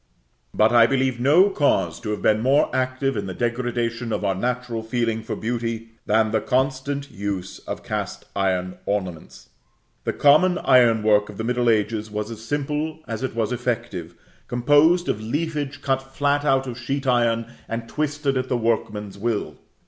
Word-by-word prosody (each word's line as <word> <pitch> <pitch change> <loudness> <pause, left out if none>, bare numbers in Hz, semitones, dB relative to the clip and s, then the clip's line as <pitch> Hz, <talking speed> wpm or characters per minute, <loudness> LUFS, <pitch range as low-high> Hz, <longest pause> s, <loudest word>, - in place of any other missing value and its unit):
But 110 +1 +3
I 120 -1 +6
believe 130 -2 0
no 160 +10 +5
cause 145 -6 +1
to 110 - -6
have 105 - -3
been 110 0 +3
more 135 +5 +3
active 130 +1 0
in 100 - -3
the 95 - -5
degradation 120 -1 -2
of 105 - -1
our 95 - +2
natural 120 +2 -2
feeling 115 0 -1
for 110 - -4
beauty, 115 0 -3 0.2
than 110 0 +3
the 110 -1 +1
constant 135 +2 -1
use 100 -2 -4
of - - -5
cast - - -4
iron 95 -2 -1
ornaments. 95 -6 -4 0.5
The - - -1
common 175 +6 +5
iron 120 -7 +4
work 105 -1 +3
of 105 - -10
the 110 - -3
middle 120 0 +1
ages 110 0 0
was 105 +1 -4
as 110 -1 -8
simple 150 +4 -2
as 115 0 -4
it 130 -3 -3
was 115 0 0
effective, 115 -9 -3 0.3
composed 145 +8 +4
of 110 - -1
leafage 145 +3 -3
cut 135 -1 +1
flat 145 +2 0
out 135 -2 +2
of 125 -1 -6
sheet 135 +3 -3
iron, 115 -2 +1 0.2
and 115 0 -4
twisted 145 -2 -1
at 130 0 -2
the 125 - +1
workman's 105 -3 -2
will. 115 -1 -2
120 Hz, 170 wpm, -23 LUFS, 110-135 Hz, 0.5 s, I